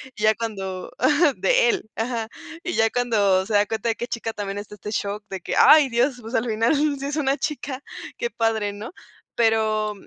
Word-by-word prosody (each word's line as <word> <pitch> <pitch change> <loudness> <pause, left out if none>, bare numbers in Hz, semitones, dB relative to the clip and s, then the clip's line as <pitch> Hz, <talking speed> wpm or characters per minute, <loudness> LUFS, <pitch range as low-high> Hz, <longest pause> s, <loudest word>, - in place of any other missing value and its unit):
y 210 - -6
ya 215 0 +5
cuando 195 -5 -5
ajá, 295 +1 +3
de - - +3
él, 400 - -2
ajá. 225 -1 -2 0.4
Y 360 - -3
ya 225 0 +3
cuando 205 -6 +2
se 215 - -5
da 205 0 +4
cuenta 225 +2 -2
de 225 - 0
que 240 - -4
es - - -19
chica 225 -1 -3
también 200 -1 -5
está 205 0 -8
este 210 +1 -7
shock 205 0 -3
de 190 - -5
que, - - -3
ay, 300 -3 +7
Dios, 245 +2 +1
pues, 225 +3 -6
al 225 - +1
final 225 +6 +2 0.2
sí 275 - -5
es 285 +1 -3
una 280 -1 +1
chica. 280 -3 -4 0.4
Qué 480 - -2
padre, 220 -3 0
¿no? 210 +6 -8 0.4
Pero 220 -2 +1
225 Hz, 215 wpm, -23 LUFS, 210-260 Hz, 0.4 s, ay